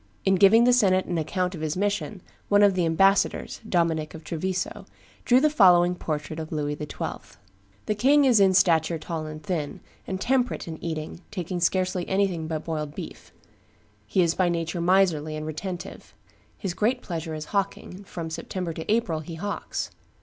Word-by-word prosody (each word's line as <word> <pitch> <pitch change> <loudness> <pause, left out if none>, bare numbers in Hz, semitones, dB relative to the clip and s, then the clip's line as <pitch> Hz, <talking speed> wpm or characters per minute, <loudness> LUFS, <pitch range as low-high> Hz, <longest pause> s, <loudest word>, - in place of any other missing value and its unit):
In 195 - +4
giving 200 +5 +6
the 245 +1 +5
senate 190 -6 +3
an 175 -2 -2
account 180 +3 -1
of 165 - -7
his 155 +1 -2
mission, 205 -1 -2 0.3
one 205 0 +5
of 200 -1 +5
the 180 -2 +1
ambassadors, 195 +4 +2
Dominic 165 -3 0
of 160 - -10
Treviso, 185 +3 -3 0.4
drew 250 +1 +5
the 305 - +4
following 180 -10 +5
portrait 155 -2 -4
of 160 -1 -6
Louis 150 -2 -1
XII.: 150 - -6 0.5
"The 215 - 0
king 275 +7 +4
is 245 -5 +5
in 190 -1 +5
stature 165 -3 +3
tall 160 0 -5
and 155 0 -8
thin, 155 -6 -3 0.3
and 190 -1 -3
temperate 250 -1 0
in 160 -1 -8
eating, 160 0 -5
taking 180 -3 -4
scarcely 180 +1 0
anything 190 -5 0
but 155 -1 -4
boiled 150 -2 -4
beef; - - -9 0.8
he 185 - +2
is 165 -1 +2
by 180 -1 +1
nature 170 0 -2
miserly 170 -4 +2
and 155 0 -5
retentive; 175 +3 -7 0.4
his 190 -4 -3
great 240 +7 0
pleasure 165 -2 -4
is 155 0 -6
hawking; 200 -1 -2
from 165 -4 -6
September 175 +1 -4
to 160 +5 -4
April 215 -8 +1
he 160 +2 -8
hawks. 205 +5 -4
175 Hz, 175 wpm, -25 LUFS, 160-195 Hz, 0.8 s, giving